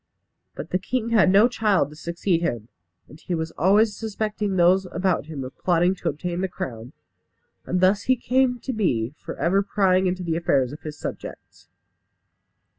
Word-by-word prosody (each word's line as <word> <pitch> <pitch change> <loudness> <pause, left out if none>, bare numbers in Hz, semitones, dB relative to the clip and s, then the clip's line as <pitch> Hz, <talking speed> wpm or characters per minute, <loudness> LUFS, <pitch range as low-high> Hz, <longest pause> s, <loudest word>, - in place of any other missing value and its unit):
But 150 - -8
the 185 - +1
king 230 +4 -2
had 215 -5 +4
no 205 +4 +6
child 210 - +1
to - - -12
succeed 170 +2 -1
him; 120 -9 -3 0.4
and 150 - -15
he 180 - -3
was 160 0 -3
always 205 +6 +3
suspecting 210 -2 -3
those 185 +2 +4
about 185 -5 0
him 150 -4 -6
of 130 - -9
plotting 175 0 +2
to 180 -3 -3
obtain 175 +4 -4
the 190 - 0
crown, 125 -7 -7 0.7
and 180 0 0
thus 195 +2 +3
he 260 - +6
came 250 +1 +1
to 260 - -4
be 130 - 0
for - - -8
ever 190 +4 +2
prying 190 -2 +2
into 180 0 -2
the 165 -2 -1
affairs 140 -7 +1
of 150 - -10
his 155 -1 -7
subjects. - - -9
180 Hz, 180 wpm, -24 LUFS, 160-205 Hz, 0.7 s, no